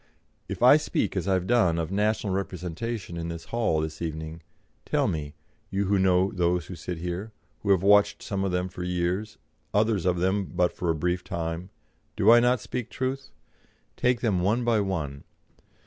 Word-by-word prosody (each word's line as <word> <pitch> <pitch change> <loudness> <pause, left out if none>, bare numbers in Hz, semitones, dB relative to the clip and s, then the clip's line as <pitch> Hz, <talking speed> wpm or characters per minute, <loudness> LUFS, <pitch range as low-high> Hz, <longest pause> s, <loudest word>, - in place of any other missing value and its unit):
If - - -3
I - - +9
speak, - - -1
as 90 0 -2
I 95 - +3
have 90 -1 -1
done, 100 -7 +3
of 80 +1 -2
national 105 0 0
representation 95 +1 -4
in 85 0 -4
this 85 -1 -6
hall 110 -10 0
this 80 0 -5
evening, 80 0 -5 0.4
tell - - +1
me, 75 -2 -3 0.3
you 100 +1 0
who 100 +1 +2
know 95 0 +3
those 90 -1 0
who 90 - -8
sit 85 +2 -5
here, 90 +6 -4 0.3
who 100 - -3
have 95 -2 +4
watched 100 0 +4
some 100 -1 -2
of 95 - 0
them 90 +1 0
for 90 -1 -8
years, 90 +4 -2 0.4
others 105 -3 +2
of 90 -1 +2
them 95 +3 +1
but 90 0 0
for 90 - -3
a 80 - +2
brief 90 +3 -1
time, 85 +2 -4 0.5
do 110 - +5
I 120 - +8
not 125 +1 +3
speak 125 -3 -4
truth? 130 +1 -3 0.7
Take 125 -1 +1
them 100 -7 +1
one 110 +7 +1
by 115 -2 +2
one. 75 -8 -3
95 Hz, 190 wpm, -27 LUFS, 85-105 Hz, 0.7 s, I